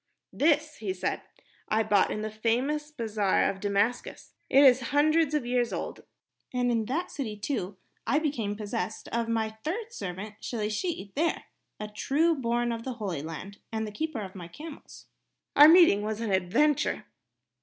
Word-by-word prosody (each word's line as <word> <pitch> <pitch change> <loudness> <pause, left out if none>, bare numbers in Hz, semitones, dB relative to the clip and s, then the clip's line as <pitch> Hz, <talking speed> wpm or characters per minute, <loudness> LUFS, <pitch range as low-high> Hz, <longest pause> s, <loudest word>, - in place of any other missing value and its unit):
"This," 305 +1 +2
he 195 -4 -3
said, 180 - -2 0.5
"I 220 +1 +2
bought 205 -2 +3
in 210 - -3
the 215 - -3
famous 255 +8 0
bazaar 220 -8 0
of 195 - -3
Damascus. 205 +4 -1 0.2
It 275 - +6
is 260 -2 +7
hundreds 305 +1 +3
of 290 -5 0
years 245 -1 +1
old. - - -5 0.5
And 245 -1 +1
in 225 -2 +1
that 325 +10 -2
city, 220 -8 -4
too, 200 -4 -3 0.3
I 290 - +3
became 245 -10 -1
possessed 215 +1 -4
of 230 0 -1
my 220 -1 0
third 440 +8 -3
servant, 200 - -6
Shelishi 215 - -3
there, 325 +3 0 0.4
a 210 - -4
true 285 +10 +1
born 240 -4 0
son 230 -1 -2
of - - -10
the 260 - -4
Holy 195 - -4
Land 165 +6 -8
and 220 -1 -2
the 210 - -6
keeper 310 +1 -3
of 190 -2 -7
my 180 -3 -8
camels. 300 - -11 0.5
Our 295 +1 +10
meeting 330 - +7
was 215 +1 -3
an 225 -3 -2
adventure...." 215 +11 +2
230 Hz, 170 wpm, -28 LUFS, 210-295 Hz, 0.5 s, Our